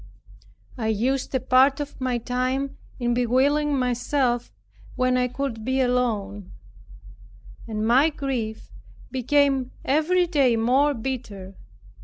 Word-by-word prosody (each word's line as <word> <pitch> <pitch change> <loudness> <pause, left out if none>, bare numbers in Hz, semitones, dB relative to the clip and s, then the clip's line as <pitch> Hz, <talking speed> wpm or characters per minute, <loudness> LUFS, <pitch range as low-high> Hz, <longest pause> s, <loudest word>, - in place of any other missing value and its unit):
I 220 - -1
used 250 +6 -1
a - - +2
part 265 +3 +4
of 290 -2 -6
my 255 -1 0
time 255 +3 -2 0.2
in 240 -1 0
bewailing 275 +5 +2
myself 250 0 0 0.4
when 255 0 +1
I 250 0 +2
could 250 -3 -4
be 260 +3 0
alone; 215 -6 -1 1.1
and 215 -1 -3
my 260 +7 +4
grief 260 -7 -4 0.4
became 270 0 +1 0.2
every 320 +6 +2
day 280 -8 +2
more 265 +6 +2
bitter. 220 -6 -6
255 Hz, 115 wpm, -24 LUFS, 235-275 Hz, 1.1 s, part